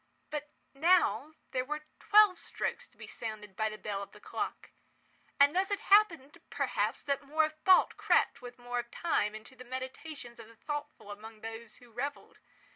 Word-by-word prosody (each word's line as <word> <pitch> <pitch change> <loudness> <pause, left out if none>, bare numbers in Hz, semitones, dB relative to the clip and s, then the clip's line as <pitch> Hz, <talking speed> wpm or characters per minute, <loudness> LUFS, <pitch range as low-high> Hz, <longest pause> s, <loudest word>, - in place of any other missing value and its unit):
But 300 -1 -4 0.2
now 310 - +3 0.2
there 255 - 0
were 300 +3 -4 0.2
twelve 420 -3 +6
strokes - - -3
to - - -30
be - - -9
sounded 210 -3 -7
by 220 +1 +1
the 215 - -7
bell 205 -2 -4
of 200 - -9
the - - -14
clock; - - -5 0.7
and 285 +3 +6
thus 380 +1 +2
it 405 -1 0
happened, 360 -10 +4
perhaps, - - -1
that 280 -1 0
more 305 +3 +2
of 310 - -5
thought 375 -1 +6
crept, - - +2
with 245 0 -9
more 245 0 -3
of 240 0 -5
time, 225 -7 0
into 220 +5 -11
the 255 - -11
meditations 260 0 -7
of 225 - -10
the 230 - -17
thoughtful 295 -4 -6
among 215 +1 -10
those 225 0 -8
who 245 -1 -18
revelled. 275 +5 -5
260 Hz, 185 wpm, -32 LUFS, 225-310 Hz, 0.7 s, twelve